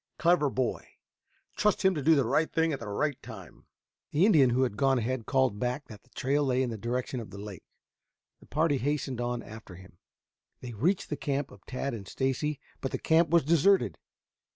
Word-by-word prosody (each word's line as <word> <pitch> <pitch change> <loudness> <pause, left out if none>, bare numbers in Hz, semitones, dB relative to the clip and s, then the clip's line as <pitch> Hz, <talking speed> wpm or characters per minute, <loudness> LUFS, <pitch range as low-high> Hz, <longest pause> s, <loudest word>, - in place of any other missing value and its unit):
Clever 165 -2 +3
boy. 130 -2 -3 0.6
Trust 210 -2 +1
him 190 - +5
to 150 - -3
do 160 +3 +5
the 140 -4 +2
right 155 +7 +1
thing 160 -1 +1
at 135 - -3
the 115 - -7
right 140 +7 -1
time." - - -12 0.4
The 160 +6 +3
Indian 150 - +5
who 125 +2 +2
had 120 -5 -1
gone 135 +5 +2
on - - +2
ahead 120 0 -2
called 130 -6 +1
back 125 +4 -3
that 105 -3 -11
the - - -30
trail 140 +4 0
lay 130 -1 +1
in 125 - -2
the - - -4
direction 125 +3 -3
of 115 - -8
the 100 - -10
lake. 100 -3 -9 0.7
The - - -19
party 150 -1 +1
hastened 135 -2 -2
on 120 0 -2
after 110 -4 -11
him. 90 -1 -16 0.6
They 125 -2 -8
reached 165 - 0
the 150 - -1
camp 140 -1 -2
of - - -16
Tad 135 +1 -3
and 100 -4 -7
Stacy, 135 +2 -1 0.2
but 135 - -2
the - - -3
camp 160 0 +3
was 170 0 +4
deserted. 170 +5 +3
135 Hz, 210 wpm, -29 LUFS, 120-150 Hz, 0.7 s, him